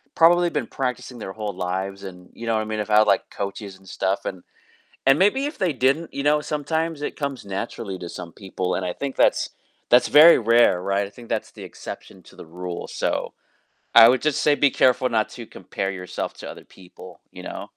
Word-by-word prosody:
probably 175 +1 +5
been 145 -7 -2
practicing 125 -1 -4
their 95 -2 -7
whole 105 -2 -4
lives 95 +2 -4
and, 90 -1 -11
you 115 - -9
know 115 - +1
what 110 - +1
I - - -4
mean? 110 0 -4
Have 105 - -3
had, 105 0 +5
like, - - +1
coaches 100 -1 -6
and 95 0 -21
stuff, 95 +2 -2
and 95 -2 -5 0.7
and 135 +3 +5
maybe 265 +9 +2
if 295 - -5
they 180 -5 +1
didn't, 135 +6 0
you 140 - -3
know, 150 +1 +3
sometimes 160 +1 -2
it - - -4
comes 140 -5 -4
naturally 95 -1 -5
to 85 - -7
some 85 - -8
people, 95 -2 -4
and 95 - -2
I 90 - -2
think 140 -2 -5
that's - - +3 0.4
that's 125 0 +5
very 155 +3 +8
rare, 115 -5 +4
right? 100 +1 0
I - - -12
think 115 +2 -14
that's - - -2
the - - -10
exception - - -10
to - - -18
the - - -11
rule. 90 +1 -6
So - - -2 0.6
I 115 - +10
would 130 +1 +2
just 155 -2 0
say 150 -1 +4
be 145 -1 +3
careful 130 0 +3
not 110 -2 +1
to 120 - -9
compare 95 +1 -5
yourself 90 -1 -5
to - - -9
other - - -12
people, 90 -2 -15
you - - -10
know? - - -7
115 Hz, 220 wpm, -23 LUFS, 95-140 Hz, 0.7 s, I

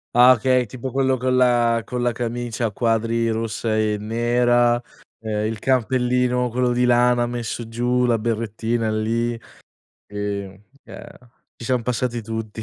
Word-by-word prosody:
Ah 125 +1 +8
okay, 130 +1 +2
tipo 125 +4 -6
quello 130 0 +1
con 130 +1 0
la 120 -2 +3
con 125 -1 -4
la 120 -1 +1
camicia 120 0 -3
a - - -6
quadri 115 +1 0
rossa 110 0 -2
e 105 -1 +1
nera, 120 +2 +2 0.4
ehm, 110 -1 -2
il 110 -1 -3
cappellino 125 0 +1
quello 125 +1 0
di 125 +1 +2
lana 120 0 +3
messo 120 -1 -4
giù, 120 +2 0
la 120 -2 +2
berrettina 115 0 -2
lì. 115 +2 -1 0.7
Sì, 105 - -17
ehm, 100 -1 -4 0.9
ci - - -10
siam 125 -1 0
passati 120 0 -2
tutti. 110 0 -6
120 Hz, 145 wpm, -22 LUFS, 110-125 Hz, 0.9 s, Ah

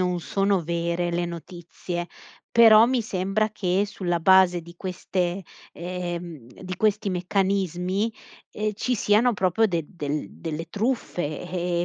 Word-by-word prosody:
non 180 -1 -1
sono 195 +2 +1
vere 170 +1 -1
le 175 0 0
notizie, 175 +1 -6 0.4
però 225 -1 +8
mi 255 0 +1
sembra 200 0 0
che, 195 -2 0
sulla 175 -4 -2
base 185 0 +5
di 170 +1 -13
queste 185 0 -2 0.3
ehm, 175 -6 -6
di 185 -1 -7
questi 210 +1 +1
meccanismi, 190 +2 0 0.4
ehm, 215 0 -2
ci 250 +4 -1
siano 220 +3 +3
proprio 190 +1 +1
del 170 -6 -2
delle 150 -2 -3
delle 165 0 -6
truffe. 205 - -2
E 175 -1 -1
180 Hz, 130 wpm, -25 LUFS, 175-200 Hz, 0.4 s, però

